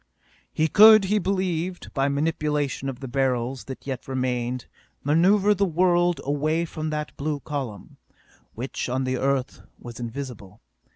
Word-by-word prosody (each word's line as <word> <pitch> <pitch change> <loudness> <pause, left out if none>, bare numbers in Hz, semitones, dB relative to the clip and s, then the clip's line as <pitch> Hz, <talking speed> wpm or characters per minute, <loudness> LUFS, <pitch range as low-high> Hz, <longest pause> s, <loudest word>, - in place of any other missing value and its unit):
He 155 - +1
could, 215 +4 +8
he 210 +2 +1
believed, 185 -2 -2
by 135 0 +1
manipulation 150 -2 -1
of 130 -1 -7
the 135 - -5
Beryls 130 0 -1
that 130 - -8
yet 130 -3 -5
remained, 125 -1 -2 0.4
maneuver 190 +8 +4
the 200 0 0
world 175 0 +2
away 155 +4 0
from 155 -1 -5
that 150 0 -4
blue 145 0 -2
column 130 -10 -6 0.6
which 125 +2 -4
on 130 +2 -1
the 130 0 -1
Earth 135 -1 -1 0.2
was 120 -1 -10
invisible. 120 -4 -7
140 Hz, 140 wpm, -24 LUFS, 130-170 Hz, 0.6 s, could